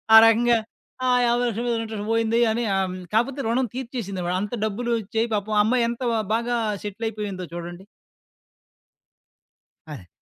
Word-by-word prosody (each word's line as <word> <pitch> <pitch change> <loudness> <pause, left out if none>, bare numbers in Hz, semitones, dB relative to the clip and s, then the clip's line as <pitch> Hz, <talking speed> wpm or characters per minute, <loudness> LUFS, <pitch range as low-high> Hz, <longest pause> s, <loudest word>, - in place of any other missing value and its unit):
ఆ - - +13
రకంగా. 235 +1 +4 0.5
ఆ! - - +2 0.2
5000000 240 -1 0
రూపాయలకి 230 -1 0
ఇంట్రెస్ట్ 215 -1 -5
పోయింది 225 0 +2
అని. 235 +2 -1
ఆహ్, 195 - +2
హ్మ్. 185 0 -6
కాపోతే 240 +5 +1
రుణం 245 +2 +1
తీర్చేసిందిమాట. 200 -9 -3
అంత 205 +2 -4
డబ్బులు 235 +3 -2
వచ్చయి 225 +2 -1
పాపం 210 +1 -2
అమ్మాయి 240 +2 +2
ఎంత 235 +2 -5 0.3
బాగా 235 +1 -1 0.3
సెటిల్ 210 +2 -5
అయిపోయిందో 200 -4 -5
చూడండి. 175 +2 -7 2.1
అదే. 95 -11 -10
225 Hz, 140 wpm, -24 LUFS, 200-235 Hz, 2.1 s, ఆ